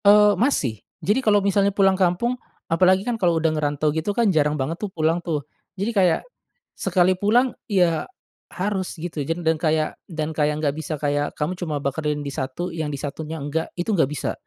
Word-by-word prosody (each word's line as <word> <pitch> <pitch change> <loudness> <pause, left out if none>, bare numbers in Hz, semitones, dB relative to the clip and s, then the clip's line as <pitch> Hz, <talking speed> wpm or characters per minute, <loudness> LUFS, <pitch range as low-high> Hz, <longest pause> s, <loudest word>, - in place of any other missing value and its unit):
Oh, 210 0 +7
masih. 165 - 0 0.2
Jadi 210 +7 +2
kalo 205 -4 +3
misalnya 200 0 +3
pulang 195 -1 +3
kampung, 190 +6 +1 0.3
apalagi 185 +3 +3
kan 235 -2 -2
kalo 170 -3 +3
udah 160 -1 +1
ngerantau 150 0 0
gitu 160 +6 -2
kan 225 -5 +3
jarang 150 -1 +2
banget 150 +5 -3
tuh 210 - -2
pulang 165 -1 0
tuh. 155 -5 -3 0.3
Jadi 205 +5 -1
kayak 185 -5 +3 0.5
sekali 185 0 +2
pulang 235 +6 +3 0.2
ya 175 -5 +2 0.5
harus 190 -1 -2
gitu 165 -2 -4
jan 165 +3 -3
dan 160 0 +4
kayak 155 -1 +1
dan 160 -2 -3
kayak 150 0 +1
nggak 145 -2 0
bisa 160 -1 -4
kayak 145 0 0
kamu 155 +4 -1
cuma 160 -5 -3
bakarin 145 +1 -2
di - - -2
satu, 135 +8 -3
yang 160 -2 -3
di 145 - -4
satunya 155 +3 -5
enggak, 155 +3 -2
itu 175 +5 -1
nggak 160 -8 +3
bisa. 150 -2 -3
165 Hz, 190 wpm, -23 LUFS, 150-195 Hz, 0.5 s, Oh